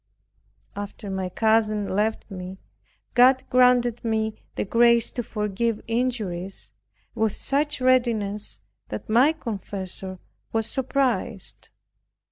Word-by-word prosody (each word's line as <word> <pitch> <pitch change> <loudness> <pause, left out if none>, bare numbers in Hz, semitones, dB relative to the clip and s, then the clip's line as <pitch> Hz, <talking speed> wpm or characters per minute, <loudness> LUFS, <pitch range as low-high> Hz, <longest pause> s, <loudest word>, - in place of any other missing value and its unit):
After 205 0 -6
my 190 -1 -2
cousin 215 0 +2
left 210 +2 -1
me, 185 0 -7 0.6
God 255 +2 +6
granted 250 -2 +4
me 220 -1 0 0.2
the - - -1
grace 235 +2 +4
to 245 - -3
forgive 210 0 -2
injuries 220 -6 -2 0.4
with 220 -2 0
such 295 +1 0
readiness, 230 - +1 0.3
that 105 - -6
my 245 +7 +5
confessor 195 - -5 0.3
was 225 -1 0
surprised. 265 +1 -2
220 Hz, 100 wpm, -25 LUFS, 200-245 Hz, 0.6 s, God